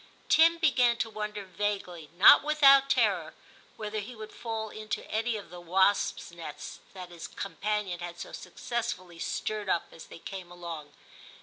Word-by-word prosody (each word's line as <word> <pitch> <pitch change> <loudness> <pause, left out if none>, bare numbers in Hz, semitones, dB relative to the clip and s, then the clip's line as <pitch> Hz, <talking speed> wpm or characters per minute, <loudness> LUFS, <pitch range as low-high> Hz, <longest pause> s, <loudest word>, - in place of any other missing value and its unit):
Tim 330 +1 +6
began 255 -7 +3
to 225 -2 -2
wonder 210 -1 -5
vaguely, 185 -4 -3
not 195 - +9
without 275 -2 +6
terror, 205 -11 +1 0.4
whether 215 0 -4
he 230 +4 -7
would 215 -1 -9
fall 220 -2 -5
into 215 0 -5
any 225 +1 0
of 205 - -10
the 175 0 -9
wasps' 190 +2 +1
nests 165 -3 -8 0.2
that 180 -2 -8
his 170 -1 -8
companion 200 -2 -3
had 175 0 -7
so - - -7
successfully 185 -3 -5
stirred 210 +3 -3
up 170 - +1
as 165 - -12
they - - -11
came 185 +1 -8
along. 170 -4 -8
205 Hz, 160 wpm, -29 LUFS, 175-225 Hz, 0.4 s, not